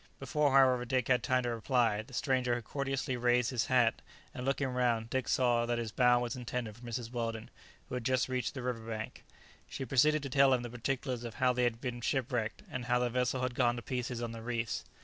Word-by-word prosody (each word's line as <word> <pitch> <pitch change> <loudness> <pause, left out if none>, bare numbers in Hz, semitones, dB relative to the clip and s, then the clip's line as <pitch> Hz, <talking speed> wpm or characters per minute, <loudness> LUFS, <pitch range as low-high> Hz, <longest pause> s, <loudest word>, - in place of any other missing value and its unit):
Before, 150 -2 +1
however, 130 -2 +5
Dick 125 0 -1
had 125 -1 +4
time 130 +1 +1
to 120 - -1
reply, 115 -2 +1
the 120 +3 -11
stranger 130 -3 +1
had 120 - -4
courteously 135 +1 -2
raised 120 0 +2
his 120 -3 0
hat, 125 -3 +3 0.3
and, 125 - -6
looking 135 0 0
round, 120 -3 0
Dick 130 -1 -1
saw 120 -2 +2
that 120 0 0
his 115 -2 -3
bow 125 0 +4
was 120 0 -2
intended 120 -3 -4
for 120 - -17
Mrs. 120 -1 -5
Weldon, 115 -2 -4 0.4
who - - -9
had 125 -1 -2
just 130 +1 +1
reached 130 +2 -2
the 130 - -5
river 125 -2 -2
bank. 110 -1 -6 0.5
She 135 - -5
proceeded 150 +4 +3
to 140 - -4
tell 135 -1 +5
him 120 - -3
the 120 - -6
particulars 125 0 -3
of 115 -2 -6
how 130 -1 +3
they 125 0 +1
had 115 -1 -1
been 125 -2 -4
shipwrecked, 125 -4 -1
and 125 -1 -4
how 125 0 +2
the 125 -1 0
vessel 125 +1 0
had 130 -1 -1
gone 120 -1 +2
to 120 - -6
pieces 125 -1 -3
on 115 - -3
the 115 0 -7
reefs. 115 -1 -2
125 Hz, 230 wpm, -32 LUFS, 120-130 Hz, 0.5 s, however